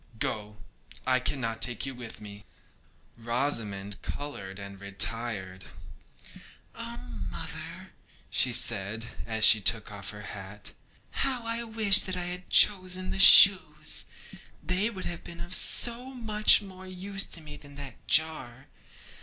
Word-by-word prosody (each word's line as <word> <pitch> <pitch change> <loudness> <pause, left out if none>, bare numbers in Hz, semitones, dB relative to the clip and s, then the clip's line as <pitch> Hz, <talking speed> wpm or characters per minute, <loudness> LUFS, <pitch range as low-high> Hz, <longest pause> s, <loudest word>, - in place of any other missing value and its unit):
Go; 105 -1 -4 0.5
I 130 0 +2
cannot 115 -4 -4
take 120 +1 +1
you 135 - -6
with 120 -3 -11
me.' 105 -1 -11 0.8
Rosamond 115 -5 -3
coloured 100 -10 -7
and 100 -1 -10
retired. 100 -1 -2 1.1
'Oh, - - -7 0.3
mother,' - - -9 0.4
said 115 -3 +3
she, 115 - -10
as 110 -1 +2
she 110 -1 +7
took 110 +1 +2
off 100 -2 -7
her 105 0 -10
hat, 100 0 -9 0.4
'how 255 -3 -3
I 230 +1 -3
wish 220 -3 +3
that 185 -1 -3
I 180 - -2
had 180 +1 -6
chosen 185 -2 +3
the - - -2
shoes! 185 -6 +6 0.6
They 185 +5 0
would 190 -5 -7
have 170 -1 -6
been 170 0 -10
of 175 +1 -7
so 245 +6 +1
much 215 -3 +3
more 190 -1 -12
use 195 +2 -4
to - - -7
me 150 -1 -11
than 145 -1 -14
that 140 -2 -10
jar. 145 -4 0
135 Hz, 135 wpm, -27 LUFS, -, 1.1 s, she